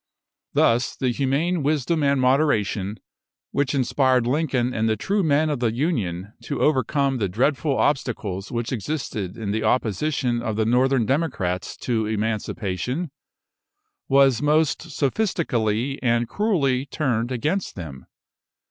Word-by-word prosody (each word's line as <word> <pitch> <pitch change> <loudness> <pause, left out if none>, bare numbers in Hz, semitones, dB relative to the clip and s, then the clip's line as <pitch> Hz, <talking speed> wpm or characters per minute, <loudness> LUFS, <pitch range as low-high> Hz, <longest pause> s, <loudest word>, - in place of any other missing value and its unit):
Thus 120 +2 +2
the 130 - 0
humane 140 +7 0
wisdom 150 +2 0
and 140 -1 +2
moderation, 115 -7 +1 0.5
which 140 0 0
inspired 130 -1 +2
Lincoln 130 -2 0
and 110 -1 +1
the 110 - +2
true 200 - 0
men 155 -2 +2
of 145 - -2
the 120 -2 +1
Union 110 - -2
to 145 - -3
overcome 140 -1 +1
the 100 -3 0
dreadful 135 - +1
obstacles 105 -9 -1
which 120 -1 -2
existed 110 - -3
in 105 -3 -3
the 110 +1 -1
opposition 125 +2 0
of 110 -3 -2
the 110 0 +1
Northern 125 +1 +3
democrats 115 - -1
to 110 -3 0
Emancipation, 110 - -2 1.0
was 135 -2 +4
most 150 +1 +2
sophistically 135 - 0
and 120 -1 +1
cruelly 145 - 0
turned 125 -6 -1
against 150 - -1
them. 70 -8 -8
130 Hz, 130 wpm, -23 LUFS, 110-145 Hz, 1.0 s, was